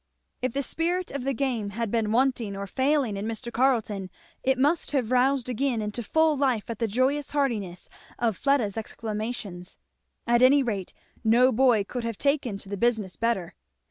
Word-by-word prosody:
If 255 Hz, -2 st, -1 dB
the 280 Hz, -, -1 dB
spirit 350 Hz, +6 st, -1 dB
of 275 Hz, -2 st, -4 dB
the 275 Hz, -, +1 dB
game 240 Hz, -6 st, -1 dB
had 220 Hz, +1 st, -3 dB
been 225 Hz, -2 st, 0 dB
wanting 235 Hz, -4 st, +1 dB
or 200 Hz, -, -4 dB
failing 265 Hz, 0 st, +1 dB
in 200 Hz, +2 st, -3 dB
Mr. 230 Hz, +1 st, -4 dB
Carleton, 225 Hz, -7 st, +1 dB, 0.3 s
it 265 Hz, 0 st, +2 dB
must 295 Hz, +6 st, +2 dB
have 255 Hz, -5 st, 0 dB
roused 255 Hz, 0 st, +2 dB
again 255 Hz, 0 st, 0 dB
into 210 Hz, +2 st, -3 dB
full 315 Hz, +7 st, +2 dB
life 255 Hz, -6 st, 0 dB
at 225 Hz, -, -6 dB
the 230 Hz, -, +1 dB
joyous 260 Hz, +6 st, +1 dB
heartiness 220 Hz, -11 st, -1 dB, 0.3 s
of 230 Hz, -4 st, 0 dB
Fleda's 245 Hz, -7 st, +1 dB
exclamations. 215 Hz, -4 st, -5 dB, 0.5 s
At 240 Hz, 0 st, +3 dB
any 270 Hz, +2 st, +6 dB
rate 205 Hz, -7 st, -3 dB, 0.3 s
no 240 Hz, +3 st, +5 dB
boy 245 Hz, -3 st, +4 dB
could 245 Hz, +4 st, -5 dB
have 230 Hz, -3 st, -3 dB
taken 280 Hz, -7 st, 0 dB
to 195 Hz, -, -12 dB
the 200 Hz, -, -3 dB
business 220 Hz, -4 st, 0 dB
better. 225 Hz, -7 st, -1 dB
235 Hz, 175 wpm, -26 LUFS, 215-270 Hz, 0.5 s, any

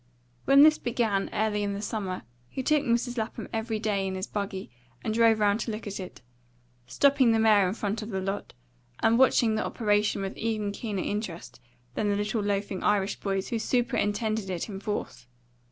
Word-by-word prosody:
When 275 Hz, +1 st, +7 dB
this 310 Hz, 0 st, +6 dB
began, 230 Hz, -5 st, 0 dB
early 215 Hz, -1 st, 0 dB
in 200 Hz, -1 st, -1 dB
the 200 Hz, -, -5 dB
summer, 195 Hz, -4 st, -3 dB, 0.3 s
he 265 Hz, -, -4 dB
took 300 Hz, +2 st, +3 dB
Mrs. 240 Hz, 0 st, 0 dB
Lapham 220 Hz, +1 st, -4 dB
every 225 Hz, 0 st, -1 dB
day 205 Hz, -3 st, -1 dB
in 190 Hz, -, -3 dB
his 190 Hz, +1 st, -3 dB
buggy 200 Hz, -5 st, -5 dB, 0.3 s
and 215 Hz, -, -1 dB
drove 225 Hz, -1 st, +4 dB
round 205 Hz, 0 st, +3 dB
to 230 Hz, -, -3 dB
look 215 Hz, +1 st, -6 dB
at 200 Hz, -1 st, -5 dB
it; 185 Hz, -7 st, -9 dB, 0.6 s
stopping 275 Hz, -, +4 dB
the -, -, +3 dB
mare 210 Hz, -3 st, +5 dB
in 185 Hz, -, -2 dB
front 210 Hz, 0 st, -2 dB
of 215 Hz, -, -6 dB
the 190 Hz, -3 st, -2 dB
lot, 195 Hz, +1 st, -4 dB, 0.5 s
and 230 Hz, +2 st, +4 dB
watching 240 Hz, -3 st, +4 dB
the 215 Hz, -, 0 dB
operation 210 Hz, -3 st, +1 dB
with 195 Hz, -, -4 dB
even 215 Hz, -2 st, -1 dB
keener 205 Hz, -2 st, -3 dB
interest 205 Hz, -, -5 dB, 0.3 s
than 210 Hz, -, 0 dB
the 205 Hz, -, +2 dB
little 210 Hz, +2 st, -1 dB
loafing 200 Hz, -1 st, -2 dB
Irish 200 Hz, -1 st, +1 dB
boys 195 Hz, -1 st, -2 dB
who 230 Hz, -, -1 dB
superintended 220 Hz, -4 st, 0 dB
it 180 Hz, -2 st, -3 dB
in 195 Hz, -3 st, -6 dB
force. 205 Hz, -, -5 dB
210 Hz, 190 wpm, -27 LUFS, 200-230 Hz, 0.6 s, When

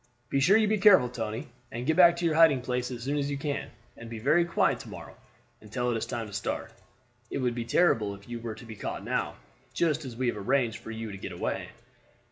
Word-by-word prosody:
Be 140 Hz, -, +2 dB
sure 190 Hz, +10 st, +6 dB
you 220 Hz, -1 st, +3 dB
be 215 Hz, 0 st, +1 dB
careful, 185 Hz, -11 st, +7 dB
Tony, 115 Hz, +3 st, -4 dB, 0.2 s
and 120 Hz, 0 st, -4 dB
get 160 Hz, -, +2 dB
back 175 Hz, -1 st, +7 dB
to 175 Hz, -, -2 dB
your 165 Hz, -, +2 dB
hiding 155 Hz, -5 st, +5 dB
place 125 Hz, 0 st, -2 dB
as 120 Hz, -2 st, -6 dB
soon 145 Hz, +3 st, -1 dB
as 140 Hz, 0 st, -1 dB
you 140 Hz, -, -2 dB
can, 140 Hz, 0 st, -3 dB, 0.3 s
and 115 Hz, -, -10 dB
be 115 Hz, -, -6 dB
very 150 Hz, +9 st, +3 dB
quiet 170 Hz, -, +1 dB
to -, -, -10 dB
morrow -, -, -10 dB, 0.5 s
until 120 Hz, +3 st, -2 dB
it -, -, 0 dB
is 115 Hz, -, -2 dB
time 115 Hz, -1 st, -3 dB
to 105 Hz, -, -11 dB
start. 100 Hz, -, -3 dB, 0.6 s
It -, -, -3 dB
would 125 Hz, -2 st, 0 dB
be 120 Hz, -1 st, -4 dB
terrible 115 Hz, -, +2 dB
if 100 Hz, 0 st, -16 dB
you 120 Hz, -1 st, -5 dB
were 115 Hz, -1 st, -5 dB
to 110 Hz, -, -12 dB
be 110 Hz, -1 st, -9 dB
caught -, -, -5 dB
now, -, -, -1 dB, 0.4 s
just 160 Hz, -2 st, +1 dB
as 125 Hz, -4 st, -7 dB
we 130 Hz, -, -1 dB
have 120 Hz, -, -3 dB
arranged 120 Hz, +2 st, +1 dB
for -, -, -11 dB
you 115 Hz, -1 st, -5 dB
to 100 Hz, -, -8 dB
get -, -, -6 dB
away." -, -, -3 dB
125 Hz, 250 wpm, -28 LUFS, 115-150 Hz, 0.6 s, careful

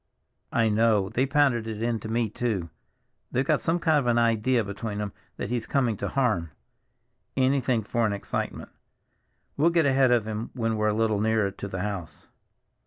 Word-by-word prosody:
"I 115 Hz, -1 st, +2 dB
know. 105 Hz, -2 st, +2 dB
They 125 Hz, +6 st, 0 dB
pounded 135 Hz, -5 st, +2 dB
it 110 Hz, -2 st, -5 dB
into 115 Hz, -1 st, -2 dB
me, 115 Hz, +1 st, 0 dB
too. 105 Hz, -6 st, -2 dB, 0.6 s
They've 130 Hz, +2 st, +1 dB
got -, -, +2 dB
some 165 Hz, +1 st, +1 dB
kind 160 Hz, -3 st, +3 dB
of 130 Hz, -, -2 dB
an 120 Hz, -1 st, +3 dB
idea 115 Hz, +1 st, +2 dB
between 105 Hz, +1 st, -5 dB
'em 105 Hz, -1 st, -4 dB, 0.2 s
that -, -, -4 dB
he's 120 Hz, -2 st, -2 dB
coming 125 Hz, -5 st, +1 dB
to -, -, -3 dB
harm. 110 Hz, -12 st, 0 dB, 0.9 s
Anything 130 Hz, -3 st, +2 dB
for 115 Hz, +3 st, -1 dB
an -, -, -1 dB
excitement. 100 Hz, -, -4 dB, 0.9 s
We'll 155 Hz, +4 st, +4 dB
get 170 Hz, -2 st, +2 dB
ahead 135 Hz, -1 st, +4 dB
of 120 Hz, -3 st, +3 dB
him 110 Hz, +1 st, -4 dB
when 115 Hz, -2 st, 0 dB
we're 105 Hz, 0 st, +1 dB
a 105 Hz, -, +2 dB
little 110 Hz, -2 st, +1 dB
nearer 110 Hz, -2 st, +1 dB
to 100 Hz, -, -7 dB
the 95 Hz, -2 st, -4 dB
house." 100 Hz, -6 st, -6 dB
115 Hz, 180 wpm, -26 LUFS, 105-125 Hz, 0.9 s, We'll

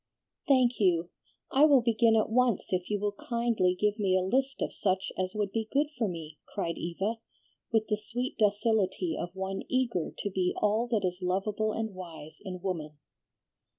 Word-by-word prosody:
"Thank 255 Hz, -3 st, +4 dB
you! 175 Hz, -4 st, +2 dB, 0.4 s
I 280 Hz, +3 st, +6 dB
will 280 Hz, -4 st, +6 dB
begin 230 Hz, -1 st, +4 dB
at 220 Hz, 0 st, +2 dB
once 240 Hz, -5 st, +2 dB
if 180 Hz, -1 st, -1 dB
you 205 Hz, -1 st, 0 dB
will 205 Hz, 0 st, 0 dB
kindly 230 Hz, -4 st, 0 dB
give 210 Hz, +1 st, +1 dB
me 190 Hz, -2 st, +3 dB
a 185 Hz, -, +1 dB
list 265 Hz, +7 st, 0 dB
of -, -, -2 dB
such 190 Hz, -1 st, 0 dB
as 185 Hz, +2 st, -2 dB
would 205 Hz, -2 st, -1 dB
be 220 Hz, 0 st, -2 dB
good 290 Hz, +2 st, +2 dB
for 235 Hz, -3 st, 0 dB
me," 160 Hz, -4 st, -7 dB
cried 170 Hz, -5 st, -3 dB
Eva, 195 Hz, +7 st, -2 dB, 0.5 s
with 220 Hz, -2 st, +3 dB
the 210 Hz, -, +1 dB
sweet 245 Hz, +4 st, -3 dB
docility 205 Hz, -4 st, +2 dB
of 175 Hz, +2 st, -5 dB
one 190 Hz, 0 st, -3 dB
eager 245 Hz, -10 st, 0 dB
to 205 Hz, -, -2 dB
be 185 Hz, -1 st, 0 dB
all 215 Hz, +3 st, +2 dB
that 220 Hz, -5 st, +1 dB
is 180 Hz, 0 st, -2 dB
lovable 200 Hz, +4 st, 0 dB
and 220 Hz, -1 st, -3 dB
wise 165 Hz, -4 st, -9 dB
in 185 Hz, -3 st, -6 dB
woman. 155 Hz, -5 st, -3 dB
205 Hz, 185 wpm, -30 LUFS, 185-230 Hz, 0.5 s, I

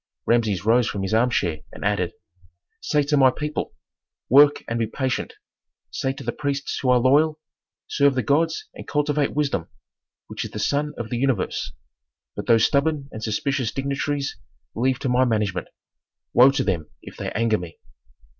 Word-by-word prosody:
Rameses 110 Hz, -6 st, +1 dB
rose 120 Hz, +1 st, +4 dB
from 100 Hz, -, -3 dB
his 95 Hz, -, -2 dB
armchair 110 Hz, -9 st, +1 dB
and -, -, -8 dB
added, -, -, 0 dB, 0.7 s
"Say 150 Hz, -1 st, +1 dB
to 145 Hz, +1 st, +1 dB
my 135 Hz, -1 st, +6 dB
people: 150 Hz, +4 st, -4 dB, 0.5 s
Work 145 Hz, +3 st, +6 dB
and 115 Hz, 0 st, -2 dB
be 115 Hz, -, 0 dB
patient. 130 Hz, +3 st, -2 dB, 0.6 s
Say 135 Hz, -, -1 dB
to 135 Hz, -, -9 dB
the 120 Hz, -, -2 dB
priests 140 Hz, +1 st, -3 dB
who 130 Hz, -, 0 dB
are 125 Hz, -, +6 dB
loyal: 150 Hz, +5 st, +3 dB, 0.5 s
Serve 140 Hz, -2 st, +3 dB
the 130 Hz, -, 0 dB
gods 160 Hz, +3 st, +1 dB
and -, -, -10 dB
cultivate 150 Hz, -1 st, 0 dB
wisdom, 140 Hz, -, -1 dB, 0.6 s
which -, -, -5 dB
is -, -, -6 dB
the -, -, -8 dB
sun 150 Hz, +1 st, -1 dB
of 110 Hz, -2 st, -6 dB
the 120 Hz, -, -1 dB
universe. 130 Hz, -5 st, -1 dB, 0.6 s
But -, -, -6 dB
those 115 Hz, -2 st, +5 dB
stubborn 145 Hz, 0 st, 0 dB
and 110 Hz, -, -8 dB
suspicious 115 Hz, +3 st, -1 dB
dignitaries 140 Hz, +1 st, -2 dB, 0.4 s
leave 130 Hz, +2 st, +1 dB
to -, -, -1 dB
my 125 Hz, +1 st, +3 dB
management. 105 Hz, -6 st, 0 dB, 0.7 s
Woe 125 Hz, +2 st, +8 dB
to 135 Hz, -, 0 dB
them 85 Hz, -6 st, -2 dB
if -, -, -11 dB
they -, -, -4 dB
anger 110 Hz, -1 st, +1 dB
me." 85 Hz, -2 st, -9 dB
130 Hz, 170 wpm, -23 LUFS, 115-145 Hz, 0.7 s, Woe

